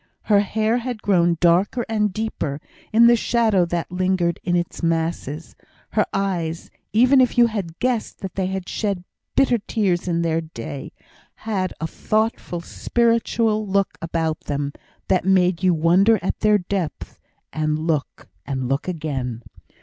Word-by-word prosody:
Her 205 -2 +4
hair 220 +3 +1
had 245 -2 -5
grown 175 -4 +3
darker 185 +8 +3
and 210 -2 +1
deeper, 185 -9 -3 0.3
in 230 +2 +6
the 235 0 +7
shadow 225 -5 +2
that 170 0 -3
lingered 180 -2 0
in 175 -2 0
its 175 0 -2
masses; 165 -2 -2 0.4
her 210 - +1
eyes, 175 -5 -2 0.2
even 255 +4 +5
if 250 - +1
you 240 - +7
could 235 - +2
have 180 -6 -4
guessed 245 -3 -2
that 190 -2 -5
they 190 -1 -1
had 190 -1 -4
shed 200 -4 -2 0.3
bitter 250 -3 +3
tears 195 -4 -1
in 170 -1 0
their 165 0 +1
day, 140 -3 -7 0.5
had 190 -5 -1
a 165 - -2
thoughtful, 215 -1 -1
spiritual 230 0 +1
look 195 0 0
about 165 -1 -1
them, 145 0 -3 0.3
that 185 -2 +2
made 185 -2 +3
you 185 -1 +4
wonder 180 +8 +4
at - - -2
their 210 -1 +4
depth, 185 -3 -4 0.3
and 155 -1 0
look 155 -2 -2 0.2
and 130 -2 -3
look 135 +6 -1
again. 135 -9 -3
185 Hz, 155 wpm, -22 LUFS, 165-215 Hz, 0.5 s, the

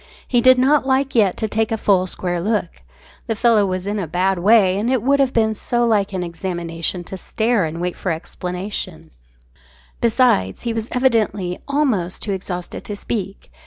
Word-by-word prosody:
He 245 -2 +2
did 255 +1 +6
not 270 +2 +3
like 270 +1 +1
yet 205 -6 +3
to 220 - -1
take 220 +1 -1
a 225 - 0
full 190 -3 +2
square 175 -1 -3
look. 205 -3 -2 0.5
The 225 - -1
fellow 220 -3 +3
was 185 0 -3
in 205 +1 -2
a 180 - -3
bad 180 +3 0
way, 195 -1 +4
and 225 +4 -1
it 255 -4 +1
would 280 +2 +3
have 270 -2 +3
been 220 -2 +2
so 240 +3 0
like 210 -4 +1
an 185 -2 -2
examination 170 0 -3
to 190 - -8
stare 220 0 0
and 160 +1 -5
wait 180 0 -2
for 185 - -3
explanations. 180 - -5 0.9
Besides, 225 - +2
he 235 - -1
was 225 0 -4
evidently 215 -8 +1
almost 255 - 0
too 205 - -2
exhausted 180 -2 -5
to 205 - -5
speak. 200 -2 -5
205 Hz, 185 wpm, -20 LUFS, 180-235 Hz, 0.9 s, did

